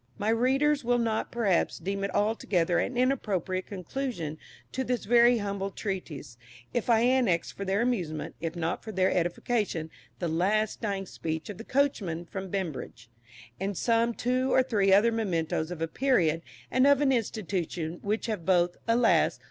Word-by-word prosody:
My 210 - -1
readers 270 +5 +2
will 245 +1 +2
not, 225 -2 -1
perhaps, 210 -7 +1
deem 195 +3 -3
it 200 - -3
altogether 190 -5 +1
an 250 - -2
inappropriate 200 -8 0
conclusion 185 - -4 0.3
to 260 - -2
this 250 -2 -2
very 240 +2 +5
humble 200 -2 -2
little 195 - -10
treatise, 150 - -5 0.3
if 240 0 -1
I 225 -1 +5
annex 240 -9 +2
for 200 - -6
their 195 +3 +1
amusement, 165 -11 -2
if 165 0 -3
not 165 -1 -2
for 220 - -6
their 185 -2 +2
edification, 175 -1 -1 0.3
"The 175 - -2
last 200 +7 0
Dying 200 -3 -2
Speech 160 -1 -5
of 200 - -11
the - - -6
Coachmen 210 -12 0
from 190 +2 -6
Beambridge," 150 - -5 0.5
and 195 0 -2
some 230 0 +2
two 255 +2 0
or 260 - +5
three 205 -6 +2
other 205 +4 +5
mementoes 170 -7 -1
of 170 -2 -4
a - - 0
period 165 - +2 0.3
and 260 +1 +4
of 285 -1 +5
an 280 -2 +3
institution 180 -8 -2
which 210 +2 -1
have 215 -7 -3
both, 175 -1 +2
alas! 230 0 +3
200 Hz, 170 wpm, -28 LUFS, 175-235 Hz, 0.5 s, very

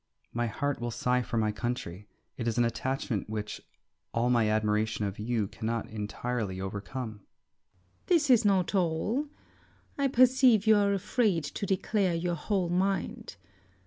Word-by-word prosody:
My 120 0 0
heart 145 +4 -2
will 120 - -2
sigh 125 +2 +1
for 120 - -3
my 110 -1 +2
country. 105 -4 -4 0.3
It 120 - -4
is 115 - -1
an 120 - +4
attachment 115 -3 -2
which 105 -1 -4 0.5
all 120 +2 +2
my 115 -3 +3
admiration 110 0 +1
of 100 0 -4
you 110 -1 -1
cannot 115 +2 -4
entirely 110 -1 -3
overcome. 105 +4 -5
Circe. 90 -2 -39
This 325 -5 +3
is 240 -2 +6
not 195 -3 +2
all. 195 - 0 0.7
I 280 - +3
perceive 255 -4 +5
you 220 0 +6
are 200 -1 +3
afraid 195 -3 +1
to 200 +7 -4
declare 190 -1 +1
your 175 +1 -1
whole 180 +2 -1
mind. 190 +1 -1
125 Hz, 150 wpm, -29 LUFS, -, 0.7 s, is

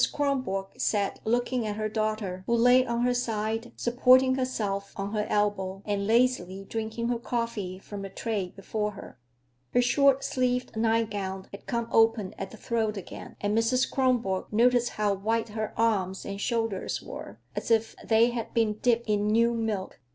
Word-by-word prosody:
Kronborg 255 -10 -2
sat 200 -2 0
looking 240 +1 0
at 210 - -2
her 215 0 -1
daughter, 215 -4 -2
who 235 - +3
lay 245 +2 +6
on 235 0 -1
her 250 0 +3
side, 225 -1 -2
supporting 255 +2 +4
herself 210 -7 -2
on 200 +1 -4
her 210 -1 -1
elbow 200 -2 0
and 200 -1 -1
lazily 220 -5 +2
drinking 225 +1 -3
her 240 -1 0
coffee 230 -6 -3
from 200 +1 -8
the 195 - -6
tray 200 -4 -3
before 210 +1 -3
her. 160 - -11 0.6
Her 245 - +6
short 275 +2 +4
sleeved 250 -4 -1
nightgown 215 -4 0
had 200 - -11
come 235 -1 -1
open 225 -3 +3
at 195 - -4
the 220 - -12
throat 220 -1 -1
again, 195 - -9
and 205 +1 0
Mrs. 230 +3 +2
Kronborg 245 -8 +1
noticed 245 +2 +3
how 210 -1 0
white 220 +4 -1
her 215 0 -3
arms 195 -5 +1
and 200 0 -5
shoulders 225 -5 -1
were, - - -8 0.2
as - - -4
if 225 -1 +2
they 230 +2 +4
had 235 -2 -5
been 215 -2 +1
dipped 235 -1 +2
in 210 -1 +1
new 230 +2 +3
milk. 220 -4 -3
220 Hz, 170 wpm, -28 LUFS, 205-235 Hz, 0.6 s, lay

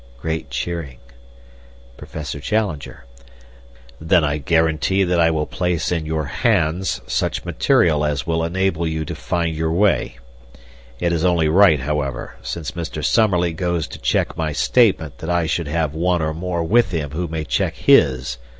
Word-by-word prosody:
(Great 80 +2 -4
cheering.) 85 -8 -4 1.0
Professor 75 +2 -7
Challenger: 80 - -3 0.9
"Then 80 +1 +3
I 75 0 0
guarantee 80 +5 +1
that 90 -1 +1
I 85 0 +5
will 80 -2 0
place 90 -1 -2
in 80 -3 -1
your 80 -1 -1
hands 90 - 0
such - - -2
material 75 -3 +2
as 75 0 -1
will 80 -1 0
enable 85 -1 0
you 80 0 -2
to - - -5
find 85 -2 -2
your 80 0 -1
way. 100 +5 +1 0.8
It 85 0 0
is 80 -1 -1
only 85 -4 +2
right, 80 -4 +5
however, 70 -3 -3
since 60 +6 -5
Mr. 85 -3 -5
Summerlee 90 -6 +2
goes 85 -1 -2
to - - -9
check - - 0
my 80 -2 -2
statement 90 - +2
that 80 - -6
I 85 -1 +1
should 80 0 -1
have 80 -1 -1
one 85 +1 0
or 80 0 -1
more 85 +1 -3
with 115 +9 +3
him 80 -5 -3
who 85 +3 -3
may 80 -1 -4
check - - -1
his. 65 -1 +3
80 Hz, 160 wpm, -20 LUFS, 75-90 Hz, 1.0 s, I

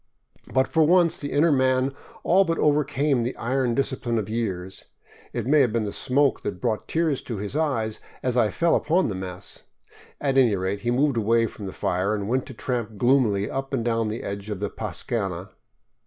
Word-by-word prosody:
But 130 0 +2
for 160 -2 +3
once 170 +1 +4
the 145 - -4
inner 155 +3 +3
man 130 0 +2 0.3
all 190 +3 +5
but 165 -3 -1
overcame 145 -2 +2
the 120 +3 -2
iron 125 0 0
discipline 130 -4 -1
of 110 -1 -3
years. 95 -5 -3 0.5
It 120 -3 -3
may 150 +4 +4
have 125 -5 +4
been 115 0 0
the 105 - -3
smoke 135 +5 +1
that 90 - -4
brought 110 +3 -2
tears 160 -4 0
to 115 - -5
his 105 +6 -4
eyes 125 -9 0 0.2
as 125 -1 0
I 115 -4 +3
fell 170 +6 +2
upon 175 +1 +2
the 100 - -3
mess; 95 -1 -7 0.6
at 135 -2 +2
any 120 -6 +4
rate 95 +2 -2
he 120 - -1
moved 135 +1 +2
away 115 +1 +3
from 105 -3 -7
the - - -5
fire 95 +5 -1
and 100 -1 -4
went 130 +3 0
to 130 - -8
tramp 115 -3 -3
gloomily 115 -4 +3
up 135 +1 -3
and 120 -3 -2
down 115 -1 +1
the 110 +2 -4
edge 100 +1 -5
of 105 -3 -4
the 105 0 -3
pascana. 95 -3 -3
120 Hz, 200 wpm, -24 LUFS, 105-140 Hz, 0.6 s, all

